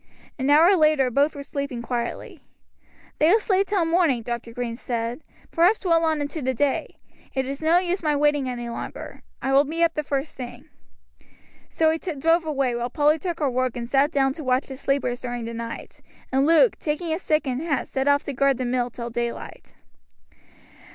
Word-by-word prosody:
An 265 +2 0
hour 325 +7 +6
later 305 -6 +3
both 285 +5 +2
were 285 - -6
sleeping 280 -4 -4
quietly. 235 -1 -4 0.8
"They 310 - +5
will 410 - +6
sleep 395 -3 +1
till 390 -5 +1
morning," 325 -8 +2
Dr. 235 0 -5
Green 235 0 -4
said, 235 +2 -4 0.3
"perhaps 365 +5 +3
well 335 -2 +3
on 315 -2 +1
into 290 +2 -4
the 260 0 -1
day; 280 +3 -1 0.4
it 265 0 0
is 275 +2 -5
no 320 +2 +4
use 360 +1 0
my 305 -3 +1
waiting 290 -2 +2
any 240 -1 -5
longer. 235 - -7 0.2
I 270 - 0
will 275 +1 +6
be 325 +4 -1
up 335 -1 +3
the 300 - -1
first 280 0 -3
thing." 245 +1 -8 1.0
So 320 -1 +2
he 320 - -2
drove 330 0 +1
away, 275 -5 0
while 240 +1 -2
Polly 300 +3 +2
took 345 -1 -4
her 280 -3 +1
work 255 0 -1
and 235 -1 -4
sat 275 +3 +3
down 270 -4 +1
to 310 - -8
watch 255 0 +1
the 265 - -8
sleepers 265 -2 -1
during 245 -2 -4
the 230 - -5
night, 230 0 -7 0.3
and 270 +2 +2
Luke, 335 +8 +4
taking 310 +3 -2
his 320 +4 -2
stick 305 -4 +1
and 260 0 -2
hat, 295 -6 -1
set 265 +1 -2
off 285 0 +3
to 285 - -5
guard 275 0 +2
the 255 - -2
mill 245 0 0
till 235 0 -7
daylight. 235 0 -5
280 Hz, 200 wpm, -24 LUFS, 250-315 Hz, 1.0 s, hour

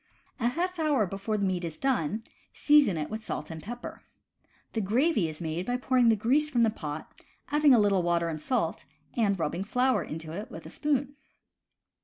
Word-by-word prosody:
A 235 - +1
half 355 +7 -1
hour 295 -8 +2
before 195 +3 -3
the 200 - 0
meat 185 -2 -1
is 160 -2 -4
done, 225 - 0 0.3
season 290 - +4
it 150 -1 -2
with 220 0 -5
salt - - -4
and 160 -1 -7
pepper. 240 +6 -7 0.7
The 225 - 0
gravy 220 - +2
is 155 - -6
made 165 +1 -3
by 245 0 0
pouring 250 -2 +3
the 225 - +5
grease 270 +8 +2
from 240 -5 +2
the 225 - +3
pot, 150 -6 -6 0.4
adding 295 -2 +5
a - - +5
little 200 -3 +3
water 170 -1 +1
and 155 -2 -4
salt, 220 -6 -1 0.3
and 205 -4 +2
rubbing 170 +4 -1
flour 250 +5 +1
into 160 0 -7
it 205 +6 -6
with - - -9
a - - -8
spoon. 285 -2 -1
220 Hz, 195 wpm, -28 LUFS, 170-260 Hz, 0.7 s, the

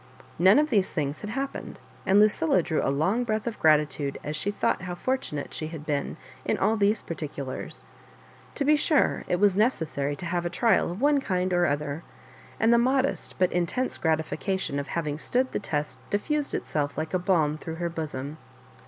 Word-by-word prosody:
None 190 +4 +7
of 300 0 +2
these 200 -5 +3
things 145 -2 -2
had 210 - -5
happened, 270 +4 -4 0.3
and 195 +2 +5
Lucilla 190 -4 +3
drew 160 -1 0
a - - +1
long 180 - +1
breath 215 -2 -1
of 235 -3 -4
gratitude 150 -2 +2
as 150 - -3
she 195 - -1
thought 205 - 0
how 180 -1 -5
fortunate 215 - -2
she 155 - -3
had 155 -2 -8
been 145 0 -2 0.3
in - - 0
all 215 +3 +2
these 210 0 +2
particu 150 -4 -5
lars. 130 - -7 0.7
To 280 - 0
be 300 +1 +5
sure, 300 0 +2
it - - +1
was 200 -2 +4
necessary 160 - 0
to 175 - -6
have 175 0 -1
a 175 - -1
trial 225 +4 +2
of 180 +6 -6
one 290 0 +4
kind 185 -5 0
or 175 -1 +3
other; 145 +1 -2 0.6
and 225 +1 +4
the 235 - +5
modest 265 +2 +1
but 185 -1 +2
intense 180 +9 -1
gratification 160 0 -1
of 140 - -4
having 150 -3 -2
stood 255 +9 0
the - - -1
test 150 -7 -3
dif 205 0 0
fused 300 -2 -1
itself 145 -2 -2
like 160 +2 -3
a 185 - +2
balm 160 -5 +1
through 160 +1 -6
her 170 +1 -2
bosom. 155 -2 -5
175 Hz, 195 wpm, -27 LUFS, 150-215 Hz, 0.7 s, None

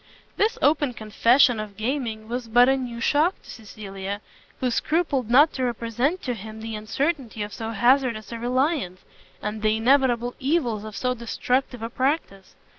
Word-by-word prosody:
This 435 +2 +1
open 290 -3 +3
confession 230 +3 +3
of 210 -2 -7
gaming 225 -2 -3
was 240 0 -4
but 245 +2 +5
a 265 - +4
new 245 -3 -5
shock 305 +9 +2
to - - -17
Cecilia, 200 -2 -7 0.4
who 255 -1 0
scrupled 285 -3 0
not 290 +6 +6
to 260 - -2
represent 240 +7 -1
to 250 - -1
him 220 0 -9
the 225 0 -5
uncertainty 230 +1 -2
of 205 - -7
so 225 -1 -5
hazardous 240 -1 +2
a 230 - -5
reliance, 250 - -1 0.4
and 210 +1 -3
the 215 0 +2
inevitable 245 0 +2
evils 255 -7 0
of 215 -1 -8
so 250 0 0
destructive 245 +1 -2
a 230 - -3
practice. 255 - -2
240 Hz, 165 wpm, -24 LUFS, 220-265 Hz, 0.4 s, not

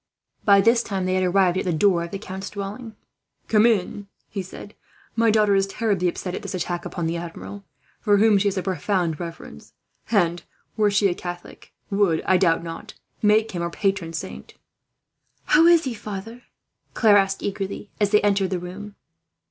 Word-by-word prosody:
By 200 -1 +6
this 230 +3 +4
time, 195 -5 -3
they 185 - 0
had 185 0 +1
arrived 185 0 +2
at - - -2
the 180 - -1
door 170 +1 +2
of 170 - -6
the 195 - -5
count's 195 0 -7
dwelling. 210 +3 -7 0.5
"Come 220 +1 +4
in, 210 -6 +3
monsieur," 205 -1 -10 0.2
he 200 - -4
said. 190 +3 -10 0.4
"My 230 0 +3
daughter 210 -1 +3
is 195 0 +2
terribly 195 -3 0
upset 180 +1 -3
at - - -4
this - - -5
attack 175 -1 -3
upon 175 -3 -4
the 165 +1 -1
Admiral, 175 +4 -8 0.3
for 205 -2 +3
whom 210 -1 +4
she 205 - +1
has 200 - -1
a 185 - -1
profound 180 -4 -1
reverence 170 -1 -9 0.4
and, 175 -6 +2 0.3
were 215 -2 +3
she 205 0 +3
a 180 - 0
Catholic, 175 0 -9 0.2
would, 195 -5 +2
I 185 - +4
doubt 165 -1 +2
not, 165 -1 -8 0.3
make 215 +1 +3
him 175 - -4
her 170 - -1
patron 195 -1 -1
saint." - - -7 0.9
"How 325 +2 +5
is 340 -1 +6
he, 260 - -3
father?" 215 +3 -8 0.5
Claire 215 -3 +5
asked 195 -1 0
eagerly, 200 0 -4
as 205 -2 +2
they 210 0 +4
entered 200 -2 +2
the 185 - -1
room. 195 +4 -8
195 Hz, 190 wpm, -23 LUFS, 180-210 Hz, 0.9 s, By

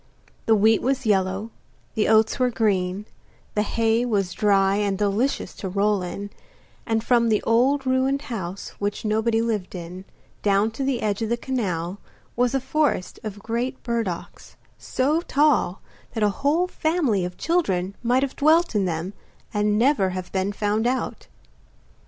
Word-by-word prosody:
The 225 - +6
wheat 220 +1 +4
was 265 0 0
yellow, 195 +1 +1 0.4
the 215 - +1
oats 220 +2 +3
were 250 -1 +3
green, 200 -4 0 0.5
the 210 - +1
hay 225 +2 +1
was 200 -6 0
dry 195 -2 +3
and 200 -2 0
delicious 210 +7 0
to 190 - -4
roll 200 +1 +1
in, 200 +3 -6 0.6
and 225 -1 0
from 235 -2 +3
the 215 -2 +2
old 265 +5 +2
ruined 260 +2 +1
house 195 -7 -5
which 205 +2 -3
nobody 220 +1 +1
lived 210 -5 -2
in, 180 +2 -8 0.4
down 205 +2 +2
to 250 +5 -4
the 265 -3 -1
edge 205 0 -1
of 220 - -1
the 235 - +1
canal, 195 -8 -3 0.4
was 245 +2 +1
a - - +3
forest 265 -6 -1
of 205 -2 -7
great 240 +3 -3
burdocks, 230 -8 -4 0.2
so 295 +6 0
tall 290 - +2 0.3
that 220 - 0
a 210 - +4
whole 305 +6 +3
family 315 - 0
of 180 0 -5
children 195 - 0
might 245 +3 +2
have 275 - -3
dwelt 320 +3 +3
in 205 -3 +1
them 170 +2 -3 0.4
and 210 0 +1
never 235 -5 +3
have 185 -1 -5
been 190 +1 0
found 210 +2 0
out. 255 +1 -2
220 Hz, 160 wpm, -24 LUFS, 195-255 Hz, 0.6 s, The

